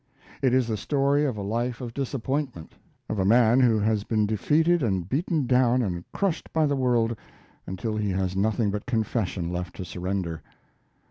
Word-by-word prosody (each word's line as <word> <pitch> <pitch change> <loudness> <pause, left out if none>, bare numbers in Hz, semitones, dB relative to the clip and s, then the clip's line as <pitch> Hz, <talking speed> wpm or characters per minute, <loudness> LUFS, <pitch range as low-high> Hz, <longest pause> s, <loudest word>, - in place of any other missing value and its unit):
It 130 - +3
is 130 -1 +3
the 110 -2 -2
story 140 +6 +1
of 130 -6 -2
a 100 - -4
life 115 +4 -2
of 120 -2 -6
disappointment; 135 - -3 0.3
of 110 - -3
a - - +2
man 115 +4 +5
who 120 -4 +4
has 105 0 +1
been 110 -1 +1
defeated 155 - +2
and 95 -8 0
beaten 155 - 0
down 125 0 +3
and 90 -4 -3
crushed 195 -5 -2
by 160 -1 +2
the 145 -1 +1
world 120 -3 +1 0.5
until 105 +4 -3
he 105 -1 -1
has 95 -1 -1
nothing 105 +1 +1
but 105 0 -5
confession 105 -7 -1
left 90 0 -4
to 95 - -6
surrender. 90 -2 -3
115 Hz, 180 wpm, -26 LUFS, 100-130 Hz, 0.5 s, man